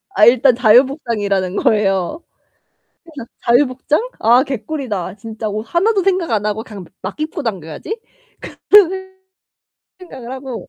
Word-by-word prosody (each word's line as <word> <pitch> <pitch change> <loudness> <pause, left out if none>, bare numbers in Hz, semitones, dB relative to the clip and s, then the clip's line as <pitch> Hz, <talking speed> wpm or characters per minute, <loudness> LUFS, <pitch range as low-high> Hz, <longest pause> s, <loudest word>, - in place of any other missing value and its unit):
아 210 - +6
일단 245 +1 +5
자유 245 +2 +6
복장이라는 205 - -2
거예요. 200 - 0 0.8
그래서 290 -8 -10
'자유 245 +4 +3
복장? 280 - -1
아 240 +4 +4
개꿀이다. 250 - -4
진짜 220 +1 -6
옷 210 +1 -3
하나도 385 - +1
생각 370 -7 0
안 210 -2 0
하고 210 +1 -2
그냥 200 -5 -10 0.2
막 190 +9 -7
입고 310 0 -4
다녀야지.' 195 - -5 0.7
그런 405 -4 +8
생 380 0 -8 0.8
생각을 260 -10 -10
하고 260 -3 -7
245 Hz, 300 characters per minute, -17 LUFS, 210-310 Hz, 0.8 s, 그런